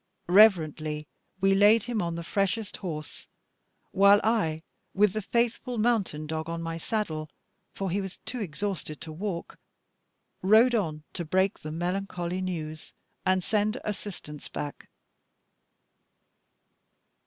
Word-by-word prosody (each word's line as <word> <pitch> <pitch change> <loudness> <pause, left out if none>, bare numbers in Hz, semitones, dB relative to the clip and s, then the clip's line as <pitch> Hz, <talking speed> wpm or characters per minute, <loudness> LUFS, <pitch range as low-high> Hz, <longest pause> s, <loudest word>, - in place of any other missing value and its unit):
Reverently 155 -6 +4 0.3
we 195 0 +5
laid 205 +3 +6
him 235 -3 -1
on 170 -1 -2
the 170 - -5
freshest 200 +4 -1
horse; 155 -5 -6 0.6
while 200 +1 +6
I 165 -9 +1 0.3
with 205 0 +4
the 215 - -1
faithful 240 +3 0
mountain 210 -9 +1
dog 160 +1 -3
on 165 0 -3
my 165 0 -4
saddle 160 -7 -2 0.4
for 195 -2 -3
he 200 +3 0
was 190 -1 -6
too 250 - -4
exhausted 185 -4 -4
to 160 - -7
walk 175 +1 -5 0.8
rode 220 +6 +6
on 160 -9 -1
to 175 - -3
break 190 +4 +1
the 155 - -6
melancholy 180 +1 -2
news, 160 -4 -5 0.3
and 185 -1 +3
send 215 +4 +1
assistance 190 -8 -6
back. 145 -1 -6
185 Hz, 125 wpm, -28 LUFS, 160-210 Hz, 0.8 s, laid